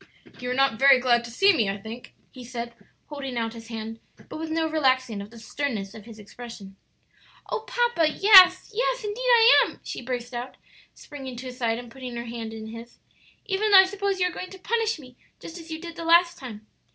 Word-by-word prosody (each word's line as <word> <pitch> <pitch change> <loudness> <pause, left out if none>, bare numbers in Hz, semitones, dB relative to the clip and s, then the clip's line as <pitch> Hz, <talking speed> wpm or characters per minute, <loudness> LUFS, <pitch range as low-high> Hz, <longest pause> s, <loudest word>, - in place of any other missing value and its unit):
"You 250 - -5
are 250 - -1
not 270 -4 +2
very 275 -1 +6
glad 240 -2 +2
to - - -9
see 390 +12 +4
me, 225 - +1
I 195 - -3
think," 220 +4 -10 0.2
he 255 - -11
said, 235 -1 -6 0.4
holding 275 -4 -6
out 225 -1 -2
his 225 -1 -11
hand, 225 -1 -7 0.3
but - - -7
with 320 0 -5
no 320 0 0
relaxing 260 -8 0
of 200 - -10
the 230 - -15
sternness 225 -4 -4
of 215 -2 -12
his 230 -2 -12
expression. 210 -2 -11 0.8
"Oh, 445 - -3
papa, 475 -10 +1
yes! 370 +2 +7
yes, - - -1
indeed 420 +2 -5
I 475 0 +7
am!" - - -7
she - - -6
burst 245 0 -5
out, 245 +2 -6 0.4
springing 270 -4 -9
to 250 +2 -8
his 250 -1 -8
side 230 -2 0
and 240 -1 -10
putting 255 -2 -8
her 235 0 -5
hand 230 -1 -6
in 220 0 -8
his, 230 +1 -11 0.5
"even 415 +2 0
though 400 - +8
I - - +2
suppose 400 0 -2
you 360 - +2
are 360 - -1
going 370 - -7
to 380 - -11
punish 450 +2 -1
me 255 -4 -15 0.2
just 335 +2 -10
as 330 0 -13
you 315 0 -5
did 335 0 -9
the 335 - -7
last 340 +1 +4
time." 220 -5 -10
260 Hz, 225 wpm, -25 LUFS, 235-350 Hz, 0.8 s, though